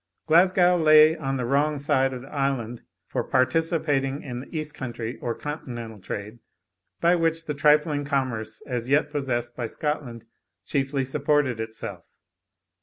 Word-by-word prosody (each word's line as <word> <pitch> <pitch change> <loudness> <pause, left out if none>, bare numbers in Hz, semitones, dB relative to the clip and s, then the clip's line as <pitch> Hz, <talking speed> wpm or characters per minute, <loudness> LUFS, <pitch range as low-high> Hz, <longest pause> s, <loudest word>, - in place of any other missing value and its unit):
Glasgow 180 +2 +5
lay 155 0 +7
on 135 -4 -2
the 125 - -2
wrong 145 +4 +1
side 135 -1 +1
of 130 -1 -6
the 135 - -13
island 135 -5 -1 0.2
for - - -2
participating 145 -1 +1
in 125 -3 -5
the 135 +5 -7
east 150 -1 -4
country 120 -4 -5
or 120 -1 -3
continental 120 -7 -6
trade, 105 +4 -6 0.6
by 170 +1 +4
which 165 -1 0
the 150 - -2
trifling 150 +1 +3
commerce 130 -6 -2
as 125 -1 -3
yet 150 +1 +2
possessed 120 -5 -2
by 120 -2 -3
Scotland 130 -4 -4 0.4
chiefly 135 -1 0
supported 140 -2 +1
itself. 110 0 -7
140 Hz, 145 wpm, -25 LUFS, 120-150 Hz, 0.6 s, lay